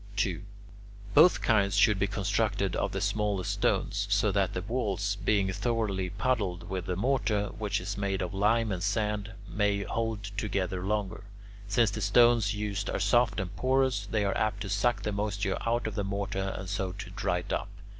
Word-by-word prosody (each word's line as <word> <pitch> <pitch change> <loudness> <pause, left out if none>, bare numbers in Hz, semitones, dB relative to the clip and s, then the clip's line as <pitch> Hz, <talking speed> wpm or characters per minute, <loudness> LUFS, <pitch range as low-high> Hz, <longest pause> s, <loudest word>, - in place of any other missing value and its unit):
2. 100 -5 0 0.7
Both 165 +5 +6
kinds 100 -4 +3
should 105 -4 +4
be 100 - +2
constructed 100 -1 0
of - - -1
the - - -2
smallest 105 -3 0
stones, 100 0 0
so 100 +1 +3
that 95 -1 +1
the 90 - -2
walls, 100 -3 -1
being 100 -2 +2
thoroughly 100 -3 -1
puddled 100 -3 -1
with 95 0 -4
the 90 - -1
mortar, 105 -2 0
which 105 -2 -1
is 100 +3 -5
made 95 -1 -1
of 90 - -4
lime 110 +3 +2
and 90 -2 -2
sand, 105 +1 -1
may 100 +1 0
hold 115 -1 -2
together 95 -3 -2
longer. 100 -1 -2 0.4
Since 105 +2 +3
the 110 - -4
stones 110 0 +4
used 105 -1 -3
are - - -1
soft 115 +5 +3
and 95 0 -4
porous, 130 -2 +1
they 105 -1 0
are 100 - 0
apt 105 -1 0
to 100 - -4
suck 105 +5 +1
the 105 - -1
moisture 100 -1 -1
out 120 +1 +1
of 110 - -2
the 100 0 -2
mortar 100 0 -2
and 95 - -6
so 95 -1 -2
to 95 -1 -8
dry 95 -3 -1
it 85 - -4
up. - - -2
100 Hz, 185 wpm, -29 LUFS, 95-110 Hz, 0.7 s, Both